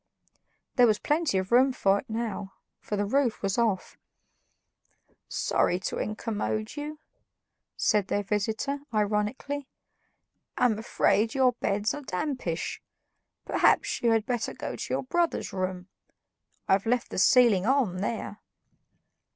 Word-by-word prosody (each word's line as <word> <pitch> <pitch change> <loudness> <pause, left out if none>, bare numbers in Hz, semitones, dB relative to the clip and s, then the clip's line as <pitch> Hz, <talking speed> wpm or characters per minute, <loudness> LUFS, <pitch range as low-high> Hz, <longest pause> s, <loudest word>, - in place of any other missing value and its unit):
There 245 -1 +7
was 215 -2 +3
plenty 300 - 0
of 190 +2 -2
room 260 +3 +5
for 200 -5 +2
it - - -12
now, 220 -3 -4 0.3
for 210 - -4
the 205 0 0
roof 245 0 0
was 195 +3 0
off. 215 -5 -1 1.3
"Sorry 175 - +1
to - - -3
incommode 215 +1 -3
you," 300 +1 -5 0.8
said 210 -2 +2
their 205 - 0
visitor 220 +7 -1
ironically. 215 +7 -1 0.9
"I'm 220 -4 +2
afraid 220 0 +1
your 260 -2 +4
beds 205 -3 -1
are 290 - -5
dampish. 250 - -3 0.6
Perhaps - - +2
you 235 - +3
had 225 -1 +2
better 245 -3 -2
go - - -5
to - - -6
your - - 0
brother's 340 +5 -1
room; 185 -1 -3 0.8
I've 195 +3 +2
left 245 +1 0
the - - -2
ceiling 225 -4 +5
on 255 -9 +2
there." 205 +1 -4
220 Hz, 130 wpm, -27 LUFS, 200-255 Hz, 1.3 s, There